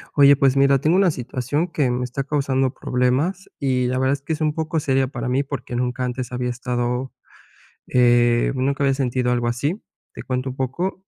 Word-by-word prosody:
Oye, 140 -1 +7
pues 135 -1 +2
mira, 140 -1 +4
tengo 160 +6 +2
una 195 -3 +4
situación 130 +5 -2
que 145 -7 0
me 125 +1 -1
está 125 +2 -3
causando 135 -2 0
problemas 135 +10 -1
y 130 -2 +1
la 130 +1 -1
verdad 130 +1 +2
es 140 - -4
que 150 +3 -3
es 160 - -5
un 155 -1 +1
poco 160 0 -2
seria 135 -3 +1
para 130 -2 -4
mí 130 +3 +1
porque 140 -3 -6
nunca 125 +1 -1
antes 125 0 -4
había 125 0 -2
estado, 125 +1 -2 0.7
eh, 120 -1 +3
nunca 135 +2 -1
había 135 -1 +3
sentido 125 -2 0
algo 120 -1 0
así. 140 - -1 0.3
Te - - -7
cuento 130 0 -3
un 130 - -9
poco. 175 +9 -3
130 Hz, 200 wpm, -22 LUFS, 125-140 Hz, 0.7 s, Oye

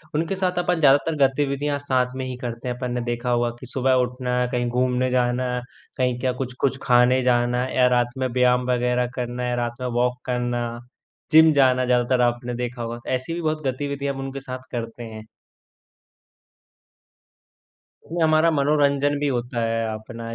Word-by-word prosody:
उनके 165 +5 0
साथ 180 -1 -1
अपन 175 -1 0
ज़्यादातर 145 +2 +4
गतिविधियाँ 140 +1 -1
साथ 130 -2 0
में 130 0 -3
ही 130 -1 -5
करते 120 0 -6
हैं। 125 - -2
अपन 125 -1 -4
ने 125 0 -2
देखा 120 +1 -3
होगा 120 0 +2
कि - - -9
सुबह 130 +1 +1
उठना, 125 0 -2
कहीं 120 -1 0
घूमने 125 +1 +1
जाना, 125 0 +1 0.5
कहीं 125 -2 +1
क्या 130 0 0
कुछ-कुछ 130 +1 -1
खाने 125 0 +4
जाना 125 0 +2
या 125 -1 +5
रात 120 0 +2
में 130 0 0
व्यायाम 125 0 +2
वगैरह 125 0 +1
करना, 125 0 -3
या 125 - 0
रात 120 0 -4
में 125 - -1
वॉक 125 0 +1
करना, 120 -1 -1 0.7
जिम 160 0 +7
जाना 130 -2 +3
ज़्यादातर 125 0 +2
आपने 120 0 0
देखा 120 0 -4
होगा। 115 +1 -4
ऐसी 130 +6 -2
भी 170 - -3
बहुत 155 -1 -1
गतिविधियाँ 140 +1 -2
हम 135 - -8
उनके 135 0 -5
साथ 130 -1 -7
करते 115 -1 -5
हैं। 110 -1 -9 2.8
नहीं, 170 +1 -3
हमारा 155 +1 +4
मनोरंजन 145 0 +2
भी 145 - 0
होता 120 0 -4
है 115 0 0
अपना 115 +1 -7
125 Hz, 170 wpm, -23 LUFS, 120-140 Hz, 2.8 s, जिम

